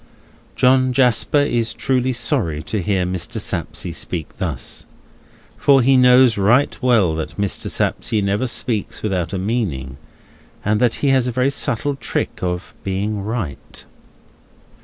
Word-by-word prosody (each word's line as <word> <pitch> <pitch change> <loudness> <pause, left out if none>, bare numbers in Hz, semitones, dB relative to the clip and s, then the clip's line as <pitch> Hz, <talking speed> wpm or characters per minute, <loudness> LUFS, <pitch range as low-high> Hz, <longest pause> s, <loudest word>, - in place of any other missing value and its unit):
John 130 0 +3
Jasper 125 +1 +3
is 120 -5 0
truly 130 -1 0
sorry 115 - 0
to 105 +2 -3
hear 95 -1 0
Mr. 90 -2 -4
Sapsea 90 - -3
speak 85 -2 -5
thus, - - -4 0.7
for 135 -3 +5
he 135 +2 +4
knows 125 -3 +5
right 120 +8 +3
well 115 -10 +3
that 80 0 -5
Mr. 100 -1 -2
Sapsea 105 -2 -1
never 100 +6 0
speaks 115 -3 -2
without 90 -5 -1
a 95 - -2
meaning, 90 - -3 0.7
and 105 +1 +2
that 120 -2 +2
he - - +4
has 130 -2 +3
a 125 +3 +1
subtle 140 0 -1
trick 135 - -3
of 90 0 -3
being 100 +2 -2
right. 100 - -5
110 Hz, 140 wpm, -19 LUFS, 95-125 Hz, 0.7 s, for